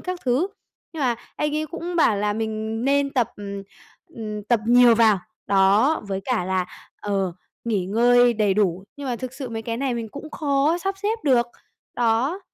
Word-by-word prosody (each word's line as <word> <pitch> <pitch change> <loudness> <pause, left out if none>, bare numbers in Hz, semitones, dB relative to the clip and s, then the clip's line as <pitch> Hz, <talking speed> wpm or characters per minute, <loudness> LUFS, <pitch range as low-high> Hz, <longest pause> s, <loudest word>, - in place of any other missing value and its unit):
các 365 -1 -5
thứ. 255 +8 +2 0.5
Nhưng 320 - -6
mà 250 -4 +2 0.2
anh 300 0 -1
ấy 310 - -1
cũng 345 +2 -5
bảo 230 -10 +4
là 205 +1 0
mình 220 +1 -3
nên 280 +1 +2
tập, 250 -6 0
ừm, 200 -1 -6 0.4
ừm, 215 -9 -6
tập 230 +2 +1
nhiều 240 0 +7
vào. 220 -3 +4 0.3
Đó, 200 +9 +3
với 195 -1 -2
cả 245 -8 0
là, 185 0 0 0.3
ờ, 195 -3 -1 0.3
nghỉ 210 -6 0
ngơi 245 +4 +4
đầy 210 -3 +2
đủ, 190 -3 +1
nhưng 285 -2 -6
mà 245 - -1
thực 255 0 -6
sự 265 -1 -6
mấy 225 -1 -5
cái 230 0 -3
này 260 0 -1
mình 230 -1 -4
cũng 285 +7 -9
khó 290 +2 +1
sắp 390 +2 -2
xếp 425 +3 -1
được. 245 -4 +3 0.5
Đó, 245 - +1
235 Hz, 190 wpm, -23 LUFS, 210-280 Hz, 0.5 s, nhiều